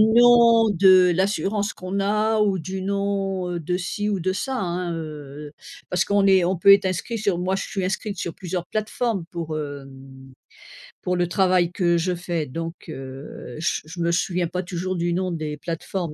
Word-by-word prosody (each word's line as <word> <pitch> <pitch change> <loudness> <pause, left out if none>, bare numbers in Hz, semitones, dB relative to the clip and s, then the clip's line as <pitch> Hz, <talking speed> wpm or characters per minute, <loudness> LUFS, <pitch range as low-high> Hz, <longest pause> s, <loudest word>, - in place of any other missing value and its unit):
nom 230 0 +6
de 185 -1 +6
l'assurance 200 +2 0
qu'on 185 +2 -5
a 215 +2 +1
ou 200 -3 +2
du 190 +3 -5
nom, 195 -2 -1
heu, 175 - -2
de 180 +3 -1
ci 205 +3 -3
ou 200 -3 -1
de 185 +2 0
ça, 260 +7 -3
hein, 175 -2 -2
heu 150 -2 -7
heu, - - -17 0.4
parce 180 0 +1
qu'on 200 -1 +2
est 190 -2 +5
on 185 +2 +1
peut 200 +4 +7
être 200 0 +5
inscrit 185 +6 -2
sur 200 -4 0
moi, 185 +2 0
je 195 - -3
suis 195 -2 -3
inscrite 200 +2 -3
sur 170 -1 -4
plusieurs 180 -1 -4
plateformes 215 -2 -2
pour, 160 -3 -4
hem, 135 -2 -9 0.7
pour 180 - -1
le 175 - +1
travail 180 -1 +2
que 175 -2 +2
je 180 +2 0
fais, 170 -2 -3
donc, 165 +5 -5
heu, 135 0 -8
je 170 - -1
je 165 +3 -10
me 170 0 +1
souviens 180 0 0
pas 180 +2 -3
toujours 185 +1 -3
du 175 0 0
nom 185 +1 -1
des 155 -3 -4
plateformes, 170 +1 -4
180 Hz, 195 wpm, -23 LUFS, 170-200 Hz, 0.7 s, peut